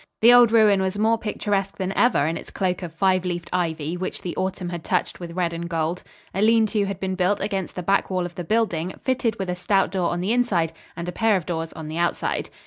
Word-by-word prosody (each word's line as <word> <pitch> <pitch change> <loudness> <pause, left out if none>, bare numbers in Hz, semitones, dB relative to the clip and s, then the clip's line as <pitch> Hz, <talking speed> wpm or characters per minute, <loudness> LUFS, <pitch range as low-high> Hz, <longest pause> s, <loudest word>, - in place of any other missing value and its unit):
The 240 +2 +9
old 240 -2 +7
ruin 215 -4 +5
was 190 +1 -1
more 220 +2 +2
picturesque 200 -2 -2
than, 190 0 -2
ever 240 - +3
in 160 +2 -1
its - - -8
cloak 185 -2 -1
of 175 -3 -5
five 185 +2 +2
leafed 175 -2 -4
ivy 165 -2 -1
which 185 +1 -5
the 175 - -4
autumn 185 -1 -2
had 175 -2 -5
touched - - -1
with 170 -1 -7
red 175 -1 -1
and 170 0 -5
gold. 165 +1 -1 0.3
A 195 - -1
lean 225 +1 +5
to 210 -2 +2
had 195 -2 -4
been 190 -1 -2
built 185 +2 +1
against 195 -2 -3
the 180 - -4
back 195 +3 +1
wall 185 -2 -1
of 175 - -7
the 175 - -5
building, 185 -4 0
fitted 250 -4 0
with 190 - -3
a 180 - -1
stout 195 +2 +1
door 185 -3 0
on 175 - -2
the 190 +6 0
inside 185 -10 +1 0.2
and 170 0 -5
a - - -2
pair 225 +2 +2
of 175 - -5
doors 165 -2 -3
on 160 -1 -8
the 160 +2 -4
outside. 175 - -1
185 Hz, 250 wpm, -23 LUFS, 170-205 Hz, 0.3 s, The